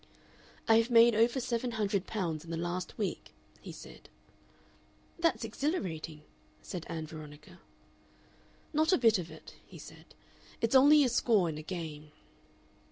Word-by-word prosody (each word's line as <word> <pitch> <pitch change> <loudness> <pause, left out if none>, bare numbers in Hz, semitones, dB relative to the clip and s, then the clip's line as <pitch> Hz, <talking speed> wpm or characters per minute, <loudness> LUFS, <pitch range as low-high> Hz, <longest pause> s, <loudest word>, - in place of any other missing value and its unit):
"I 225 - +6
have 230 +2 +2
made 235 0 +6
over 230 +4 +2
seven 245 -1 -2
hundred 205 -3 -1
pounds 170 -8 -3
in 165 - -13
the 165 - -3
last 175 +2 -4
week," 205 -3 -4 0.3
he - - -9
said. - - -13 1.1
"That's 330 -6 +1
exhilarating," 180 - -3 0.4
said 170 - -7
Ann 160 -2 -4
Veronica. 150 -1 -12 1.1
"Not 315 +3 +2
a - - +5
bit 225 -5 +4
of 170 -1 -6
it," 160 0 -13
he - - -14
said; - - -14 0.4
"it's 230 +1 0
only 290 +3 +7
a - - +3
score 215 -7 +2
in 155 -1 -5
a - - -6
game." 155 -3 -7
200 Hz, 150 wpm, -31 LUFS, 160-235 Hz, 1.1 s, only